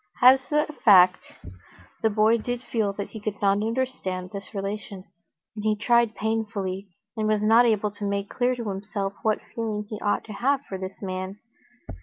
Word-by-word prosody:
As 260 +2 +6
a 300 0 +3 0.2
fact, 185 -3 +6 0.7
the 220 - +3
boy 220 +2 +3
did 245 +2 -4
feel 220 -6 0
that 200 0 -5
he 220 - -8
could 210 -1 -4
not 200 0 +2
understand 220 -6 -2
this 200 0 -7
relation, 200 -1 -5 0.5
and 210 - -6
he 215 0 +2
tried 235 +1 +2
painfully, 205 -3 -2 0.3
and 215 -1 -1
was 215 -1 +1
not 230 +3 +6
able 210 -2 +1
to 205 0 -6
make 200 0 -2
clear 250 +3 0
to 235 -3 -5
himself 195 0 -3
what 215 -1 +2 0.2
feeling 215 -2 -3
he 215 -1 -6
ought 205 - 0
to 215 - -9
have 275 +5 +1
for 190 - -5
this 190 0 -7
man. 185 +1 -4
210 Hz, 180 wpm, -25 LUFS, 200-225 Hz, 0.7 s, As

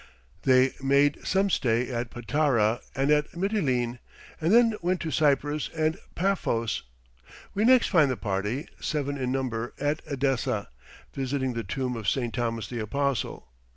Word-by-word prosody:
They 130 0 +5
made 140 +2 +3
some 195 +1 +2
stay 120 -2 +1
at 120 -1 -2
Patara 120 -3 +1 0.2
and 135 +2 +1
at 150 0 +2
Mitylene, 130 - 0 0.4
and 165 +3 +2
then 230 0 +6
went 180 +1 0
to 160 - -3
Cyprus 145 0 +1
and 155 0 +1 0.2
Paphos; 170 - 0 0.7
we 210 +2 +1
next 255 0 +5
find 160 -7 +4
the 130 - -1
party, 105 - -2
seven 145 -2 -2
in 130 -2 -2
number, 120 -3 -2
at 145 +2 0
Edessa, 130 -5 -1 0.4
visiting 130 -1 -1
the 115 -1 -3
tomb 130 0 -3
of 110 -3 -1
St. 120 -4 -1
Thomas 115 -2 -2
the 120 - -5
Apostle. 135 - -2
135 Hz, 150 wpm, -27 LUFS, 120-150 Hz, 0.7 s, then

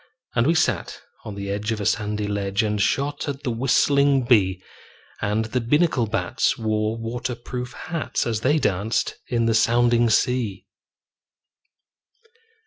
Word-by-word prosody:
And 115 +2 +2
we 165 - +3
sat - - 0 0.3
on 105 - -6
the 100 0 -4
edge 105 +2 -2
of 110 - -2
a 100 - -3
sandy 105 0 0
ledge 100 +1 -1
And 105 -1 -1
shot 145 +7 0
at 140 0 -5
the 125 - -1
whistling 135 +3 +3
bee; 95 -6 +3 0.6
And 105 +2 0
the 125 +3 -2
Binnacle 140 -1 +2
bats 110 +2 0
wore 110 0 -1
water 120 +2 -4
proof 125 +1 -6
hats 160 -1 -3
As 110 -2 -2
they 145 +6 +3
danced 105 -5 -1
in 115 -2 0
the 115 - +2
sounding 120 +1 +3
sea. 115 -4 0
115 Hz, 145 wpm, -23 LUFS, 105-125 Hz, 0.6 s, we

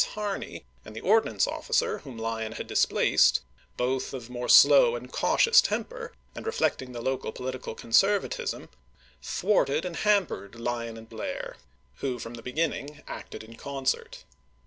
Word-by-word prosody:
Harney, 210 -2 -4 0.2
and 110 - -11
the 110 - -6
ord 220 +3 +4
chap. - - -3
xi. - - -8
nance - - +2
officer 475 -2 0
whom 130 -5 -10
Lyon 110 -1 -3
had - - -6
displaced, - - +3 0.4
both 130 +2 -1
of 125 -2 -8
more 125 0 -4
slow - - +8
and - - -8
cautious 470 +1 +5
temper, 485 -1 -3 0.2
and - - -8
reflecting 130 - -1
the 120 -1 -6
local 130 0 -2
political 130 -2 -5
conservatism, 195 - +1 0.5
thwarted 165 - +1
and 175 -2 -4
ham 205 -2 +3
pered 100 - -8
Lyon 115 -1 -3
and 110 0 -11
Blair, 110 -1 -6 0.4
who 130 -3 -2
from 115 0 -7
the 120 - -8
beginning 145 +3 -3
acted - - -8
in 115 +1 -13
concert. 135 +1 -3
130 Hz, 160 wpm, -27 LUFS, -, 0.5 s, slow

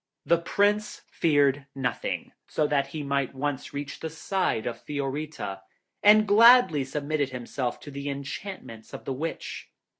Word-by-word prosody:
The 170 0 +4
Prince 205 +4 +1
feared 145 -3 +2
nothing 125 -3 -3 0.2
so 155 - 0
that 140 -2 +1
he 150 +1 -5
might 140 -1 -1
once 140 0 -3
reach 140 0 -5
the 160 - -4
side 160 - -1
of 120 - -4
Fiorita, 145 -7 -4 0.4
and 215 +1 +6
gladly 225 - +7
submitted 145 +1 -2
himself 125 0 -4
to 145 - -9
the 140 +1 -5
enchantments 140 - -7
of - - -10
the 135 - -2
Witch. 160 +5 -5
145 Hz, 145 wpm, -27 LUFS, 135-165 Hz, 0.4 s, gladly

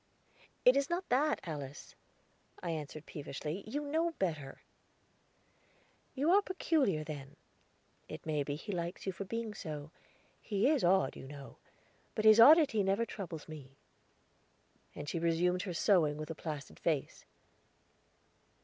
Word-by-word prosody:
"It 250 - +8
is 280 +2 +1
not 350 +2 -2
that, 290 +5 +2
Alice," 145 -4 -7 0.7
I 170 - -1
answered 155 -1 -6
peevishly; 150 +5 -5
"you 290 +6 -2
know 325 +3 0
better." 155 -7 -3 1.5
"You 290 +5 +2
are 400 +2 +6
peculiar, 305 - +1
then; 145 -2 -8 0.7
it - - -8
may 155 -2 0
be 145 0 -2
he 185 +8 -6
likes 175 -1 -4
you 190 - 0
for 195 +2 -6
being 230 +1 -4
so. 150 -5 -7 0.5
He 205 +1 +1
is 295 -6 +2
odd, 175 -6 +3
you 135 - -9
know; 140 -1 -10 0.6
but 215 - -1
his 215 +1 +8
oddity 280 -3 +8
never 195 +4 +1
troubles 175 -8 -7
me." 140 -4 -11 1.2
And 145 - -7
she 170 - -2
resumed 170 +2 +1
her 180 - -4
sewing 160 -5 +3
with 155 +1 -5
a - - -2
placid 150 -4 -7
face. 155 -5 -1
175 Hz, 140 wpm, -33 LUFS, 150-230 Hz, 1.5 s, It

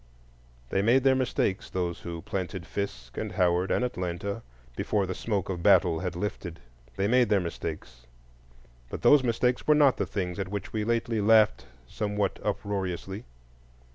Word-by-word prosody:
They 95 - +2
made 120 +5 +4
their 135 -1 +5
mistakes, 125 -7 0
those 90 -2 -2
who 85 -1 -7
planted 95 -1 -4
Fisk 65 -13 -5
and - - -4
Howard 90 +1 +2
and 125 - +1
Atlanta 100 -1 -3 0.3
before 100 - 0
the 95 - -3
smoke 100 -1 -2
of 90 -3 -4
battle 90 -4 +4
had 90 0 -3
lifted; 90 -2 -4 0.4
they 95 +1 0
made 125 0 +4
their 105 -2 +4
mistakes, 75 -8 -6 0.8
but - - -6
those 145 -2 +6
mistakes 125 +1 0
were 150 - +6
not 145 -3 +5
the - - -1
things 90 -2 -3
at 95 -1 -3
which 100 -2 -5
we 110 -1 -1
lately 115 0 0
laughed 105 - +4 0.2
somewhat 105 - -2
uproariously. 95 0 -3
100 Hz, 160 wpm, -28 LUFS, 90-110 Hz, 0.8 s, those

